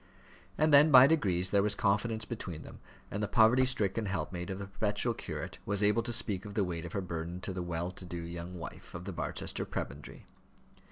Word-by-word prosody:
And 155 Hz, 0 st, +3 dB
then, 145 Hz, +2 st, +8 dB
by 130 Hz, -3 st, +10 dB
degrees, 95 Hz, -, +2 dB
there 100 Hz, -, +4 dB
was 105 Hz, 0 st, +1 dB
confidence 110 Hz, +3 st, 0 dB
between 90 Hz, -9 st, -6 dB
them, -, -, -12 dB, 0.3 s
and 100 Hz, -, -3 dB
the 105 Hz, -, 0 dB
poverty 120 Hz, +5 st, +5 dB
stricken 110 Hz, -3 st, +1 dB
helpmate 95 Hz, -1 st, -3 dB
of 95 Hz, -, -3 dB
the 100 Hz, -, -5 dB
perpetual 105 Hz, +4 st, -1 dB
curate -, -, -6 dB
was 100 Hz, 0 st, -1 dB
able 105 Hz, +3 st, +4 dB
to 120 Hz, +1 st, -3 dB
speak 105 Hz, -5 st, 0 dB
of 105 Hz, -1 st, -9 dB
the 105 Hz, -, +2 dB
weight 85 Hz, -2 st, -4 dB
of 85 Hz, -, -8 dB
her 100 Hz, -, -1 dB
burden 85 Hz, 0 st, -5 dB
to 95 Hz, +1 st, -4 dB
the 90 Hz, -, -3 dB
well 85 Hz, 0 st, -3 dB
to 90 Hz, -, -8 dB
do 85 Hz, 0 st, -6 dB
young 85 Hz, +1 st, -6 dB
wife 85 Hz, -, -9 dB
of 90 Hz, +1 st, -7 dB
the 100 Hz, -, -5 dB
Barchester -, -, -3 dB
prebendary. 70 Hz, +3 st, -6 dB
100 Hz, 215 wpm, -31 LUFS, 90-110 Hz, 0.3 s, by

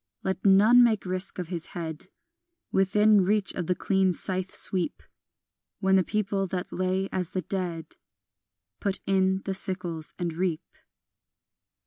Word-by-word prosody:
Let 190 Hz, 0 st, -2 dB
none 210 Hz, +5 st, +7 dB
make 220 Hz, -4 st, +2 dB
risk 185 Hz, +1 st, -3 dB
of 180 Hz, -3 st, -4 dB
his 170 Hz, -2 st, -4 dB
head 160 Hz, -1 st, -5 dB, 0.6 s
Within 210 Hz, +2 st, +4 dB
reach 205 Hz, +1 st, +1 dB
of 175 Hz, -3 st, -4 dB
the 180 Hz, -, +1 dB
clean 190 Hz, 0 st, +2 dB
scythe 185 Hz, +2 st, -2 dB
sweep, 190 Hz, +8 st, -2 dB, 0.8 s
When 190 Hz, -1 st, +3 dB
the 190 Hz, -, +4 dB
people 200 Hz, 0 st, -1 dB
that 180 Hz, 0 st, -4 dB
lay 185 Hz, +1 st, 0 dB
as 180 Hz, -2 st, -2 dB
the 185 Hz, -2 st, -3 dB
dead 170 Hz, -3 st, -4 dB, 0.8 s
Put 195 Hz, -1 st, -1 dB
in 190 Hz, 0 st, +2 dB
the 195 Hz, -, -1 dB
sickles 180 Hz, -4 st, -3 dB
and 170 Hz, -2 st, -2 dB
reap. 170 Hz, -1 st, -1 dB
190 Hz, 140 wpm, -27 LUFS, 180-195 Hz, 0.8 s, none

